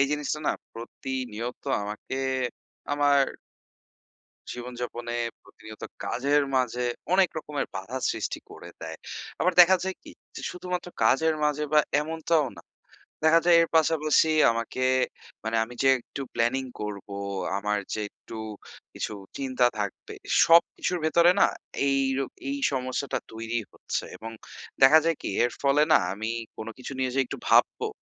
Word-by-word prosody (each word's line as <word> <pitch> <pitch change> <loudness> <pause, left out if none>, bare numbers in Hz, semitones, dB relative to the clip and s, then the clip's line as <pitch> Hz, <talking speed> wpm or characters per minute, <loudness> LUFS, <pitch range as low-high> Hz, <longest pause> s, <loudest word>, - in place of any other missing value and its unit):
এই 140 - +5
জিনিসটা 150 0 -1
না, - - +3 0.2
প্রতিনিয়ত 120 0 -5 0.2
আমাকে 105 +5 -5 0.7
আমার 145 -1 +4 1.3
জীবনযাপনে 120 -1 -5 0.3
প্রতিনিয়ত 110 0 -13 0.2
কাজের 140 +3 +2
মাঝে 125 -1 +1 0.3
অনেক 185 -1 +5
রকমের 150 -2 -3
বাধা 95 +7 -4
সৃষ্টি - - -3
করে - - -10
দেয়। - - -6 0.4
আবার 180 0 +2
দেখা 180 +2 +7
যায় 190 0 -2
কি - - -11 0.2
যে, - - -6
শুধুমাত্র 180 0 -4 0.2
কাজের 160 0 +4
মাঝে, 150 0 +1 0.4
এমনটাও 160 -1 +1
না। - - -11 0.6
দেখা 160 +1 +6
যায়, 175 -1 +7
এর 165 - 0
পাশাপাশি 160 0 +3 0.2
আমাকে 115 +2 -2 0.6
মানে 115 0 0
আমি 120 +2 -11
যে 135 - +4
একটু 140 - -7
প্ল্যানিং 120 +3 +1 0.2
করব, 105 -2 -5 0.5
আমার 105 +1 0 0.2
যে 110 - -3
একটু 115 - -12 0.6
কিছু - - -3 0.3
চিন্তা 130 -2 +2
থাকবে, 100 -2 -4 0.3
সব 165 +1 +8
কিছুর 180 - -1
ভেতরে 170 +2 +5
না, - - +8 0.4
এই 135 0 +3 0.2
রো 135 - +1 0.2
এই 280 - -1 0.2
সমস্যাটা 130 +1 -2
তৈরি 115 +1 -3
হচ্ছে। - - -4
এবং 115 - -7 0.5
দেখা 140 +4 +9
যায় 165 -1 +2
কি, - - -3 0.2
এর 120 - +1
ফলে 140 +1 +4
না, - - +8
আমি 110 +3 -3 0.3
কোনো 110 +1 -6
কিছু 130 - -7
নিয়ে 130 -1 0
যে - - 0
একটু - - -5
ভাববো, - - +4
135 Hz, 145 wpm, -27 LUFS, 120-155 Hz, 1.3 s, দেখা